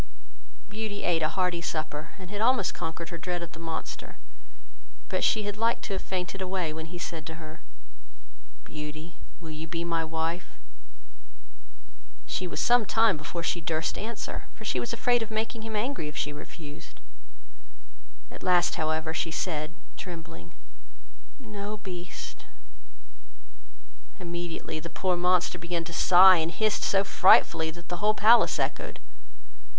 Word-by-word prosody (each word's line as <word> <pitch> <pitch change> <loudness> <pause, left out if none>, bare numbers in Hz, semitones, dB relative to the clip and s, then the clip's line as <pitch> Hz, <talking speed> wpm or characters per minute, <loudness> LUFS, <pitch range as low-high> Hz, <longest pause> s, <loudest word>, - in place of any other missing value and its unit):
Beauty 210 0 -4
ate 170 -2 +2
a 155 - +2
hearty 180 -2 0
supper, 155 -2 -3
and 185 -1 -10
had 205 0 -3
almost 235 -4 +3
conquered 165 +1 -4
her 170 -1 -6
dread 175 0 -2
of 170 - -7
the 165 - -11
monster; 165 -1 -5 0.9
but - - 0
she 215 - +3
had 205 0 -3
liked 230 +1 +1
to 200 - -3
have 190 - -2
fainted 185 +1 -3
away, 185 -4 -1
when 160 0 -6
he 175 +2 -7
said 165 -2 -5
to 160 - -6
her, 160 -1 -10 1.0
"Beauty, 155 +2 -7 0.2
will 165 -3 -8
you 155 +1 -6
be 165 +1 -3
my 165 -1 0
wife?" 160 +2 -3 1.7
She 185 - -2
was 150 -3 -4
some 240 +9 +5
time 225 -3 +4
before 155 +3 -5
she 170 +1 0
durst 160 0 -1
answer; 225 +1 -4
for 220 - -11
she 130 - 0
was 120 - -3
afraid 245 -1 +2
of 225 - -3
making 220 +1 -2
him 220 0 -5
angry, 220 - -1
if 150 - -7
she 145 - -1
refused. 150 0 -10 1.3
At - - -10
last, 180 -1 +3
however, 160 0 0
she 165 - -1
said, 160 -1 -2 0.2
trembling, 170 -4 -8 0.8
"No, 210 -5 -6
Beast." 180 -3 -8 1.7
Immediately 175 -3 -4
the 170 - -7
poor 185 0 +1
monster 180 0 +2
began 170 0 -2
to 170 +1 -8
sigh, 185 +2 +8
and 160 0 0
hissed 215 +3 +1
so 195 0 +3
frightfully, 170 -4 +5
that 170 +2 -10
the 175 - -2
whole 210 +4 +3
palace 225 +3 +6
echoed. - - -2
175 Hz, 155 wpm, -28 LUFS, 160-200 Hz, 1.7 s, sigh